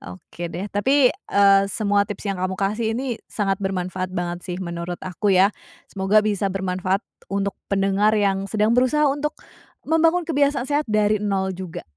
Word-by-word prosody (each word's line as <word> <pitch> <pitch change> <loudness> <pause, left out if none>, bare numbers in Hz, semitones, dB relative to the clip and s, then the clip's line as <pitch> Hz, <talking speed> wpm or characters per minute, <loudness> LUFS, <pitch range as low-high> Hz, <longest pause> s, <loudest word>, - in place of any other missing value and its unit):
Oke 95 - -8
deh, 175 +4 -5
tapi 260 +6 +3
eee, 200 - +3
semua 205 -1 +1
tips 205 - -6
yang 195 -2 -2
kamu 185 0 -1
kasih 215 +3 -1
ini 250 -3 -3
sangat 195 -2 -1
bermanfaat 185 -1 -2
banget 175 -1 -2
sih 180 -1 -4
menurut 170 0 -4
aku 185 +3 -2
ya. 190 +2 +5 0.4
Semoga 200 +2 +3
bisa 205 -2 0
bermanfaat 190 +1 -1 0.3
untuk 200 0 -1
pendengar 200 +2 +2
yang 195 -1 +1
sedang 215 +1 +1
berusaha 255 +5 +3
untuk 295 +2 -2 0.5
membangun 325 +3 +3
kebiasaan 285 -4 +1
sehat 295 +1 +1
dari 215 0 +2
0 195 -2 0
juga. 185 -2 -7
200 Hz, 160 wpm, -22 LUFS, 190-220 Hz, 0.5 s, ya